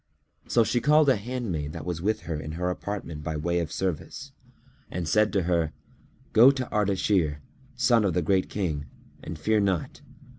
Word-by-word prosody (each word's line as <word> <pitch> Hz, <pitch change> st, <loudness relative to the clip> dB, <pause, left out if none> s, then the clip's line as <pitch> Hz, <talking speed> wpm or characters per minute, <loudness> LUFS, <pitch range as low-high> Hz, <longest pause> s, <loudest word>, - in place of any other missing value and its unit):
So 120 Hz, -, +4 dB
she 120 Hz, +2 st, 0 dB
called 150 Hz, +2 st, +5 dB
a 130 Hz, -, +5 dB
handmaid 100 Hz, -, -4 dB
that -, -, -7 dB
was 85 Hz, -2 st, -3 dB
with 110 Hz, +4 st, 0 dB
her 80 Hz, -, -5 dB
in 75 Hz, 0 st, -6 dB
her 90 Hz, +2 st, -1 dB
apartment 90 Hz, -5 st, -5 dB
by 80 Hz, +1 st, -3 dB
way 85 Hz, +3 st, 0 dB
of 80 Hz, -4 st, -3 dB
service, 95 Hz, -5 st, -4 dB, 0.6 s
and 85 Hz, -2 st, -4 dB
said 105 Hz, +6 st, +3 dB
to 100 Hz, -3 st, +2 dB
her, 85 Hz, -3 st, 0 dB, 0.6 s
"Go 120 Hz, +4 st, +8 dB
to 130 Hz, -2 st, -1 dB
Ardashir, 95 Hz, -6 st, +1 dB, 0.4 s
son 120 Hz, -2 st, +3 dB
of 95 Hz, -4 st, 0 dB
the 90 Hz, -, +1 dB
Great 95 Hz, +3 st, +1 dB
King, 80 Hz, -8 st, -2 dB, 0.4 s
and 80 Hz, -, -6 dB
fear 110 Hz, +7 st, +2 dB
not. 95 Hz, -6 st, -1 dB
95 Hz, 180 wpm, -26 LUFS, 80-110 Hz, 0.6 s, Go